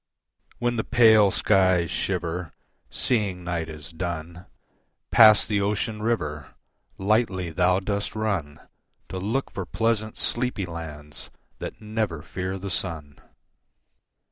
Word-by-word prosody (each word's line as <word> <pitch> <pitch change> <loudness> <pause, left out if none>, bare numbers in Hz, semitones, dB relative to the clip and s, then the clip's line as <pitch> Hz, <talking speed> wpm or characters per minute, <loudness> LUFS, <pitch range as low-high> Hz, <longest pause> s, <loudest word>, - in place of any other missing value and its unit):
When 120 0 -1
the 110 - 0
pale 110 -4 +6
skies 95 -4 +3
shiver, 90 -1 -2 0.4
Seeing 100 -7 0
night 85 -2 -3
is 75 0 -9
done, 85 0 -5 0.6
Past 110 -2 +7
the 105 -2 +1
ocean 105 +2 -1
river, 75 -11 -2 0.4
Lightly 95 -4 +1
thou 90 +3 +3
dost 100 +2 -3
run, 95 -9 -2 0.5
To 95 - -4
look 115 +8 -2
for 95 - -4
pleasant, 110 0 -1
sleepy 120 -5 0
lands, 80 -3 -8 0.3
That - - -6
never 105 -8 -2
fear 95 +3 -4
the 95 0 -6
sun. 80 -4 -4
95 Hz, 115 wpm, -25 LUFS, 85-110 Hz, 0.6 s, Past